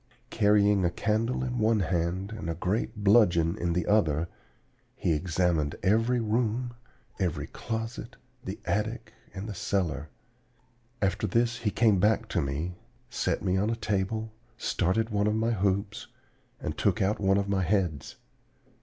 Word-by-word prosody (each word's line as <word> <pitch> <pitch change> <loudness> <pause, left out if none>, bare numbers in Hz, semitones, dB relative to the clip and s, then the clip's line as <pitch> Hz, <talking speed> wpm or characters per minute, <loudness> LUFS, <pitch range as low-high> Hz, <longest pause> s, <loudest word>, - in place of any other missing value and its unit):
Carrying 105 -2 +4
a 85 - +3
candle 110 +8 0
in 125 -1 -2
one 110 -1 +3
hand 90 +2 -1
and 95 -6 -5
a 85 - -2
great 105 +4 -2
bludgeon 90 -5 +4
in 85 -4 -1
the 90 +1 0
other, 85 -6 +2 0.7
he 85 - 0
examined 80 -2 0
every 115 +5 +3
room, 115 +2 0 0.5
every 85 -6 -1
closet, 115 +5 -5 0.3
the 95 +2 -6
attic, 110 +3 -2 0.2
and 100 +1 -6
the 105 - -4
cellar. 85 -5 -1 0.9
After 95 - +1
this 115 0 +1
he 105 - 0
came 105 -2 +3
back 110 +3 +2
to 85 - +1
me, 75 +6 -3 0.3
set - - -1
me 95 -1 +1
on 105 +3 +1
a 115 - 0
table, 110 0 -2 0.3
started 110 +5 0
one 105 0 +1
of 105 - +1
my 115 +1 +1
hoops, 100 0 -1 0.5
and - - -4
took - - +1
out 100 +2 +1
one 95 -1 +3
of 100 0 0
my 100 -1 +1
heads. 90 -6 -1
100 Hz, 155 wpm, -28 LUFS, 90-110 Hz, 0.9 s, Carrying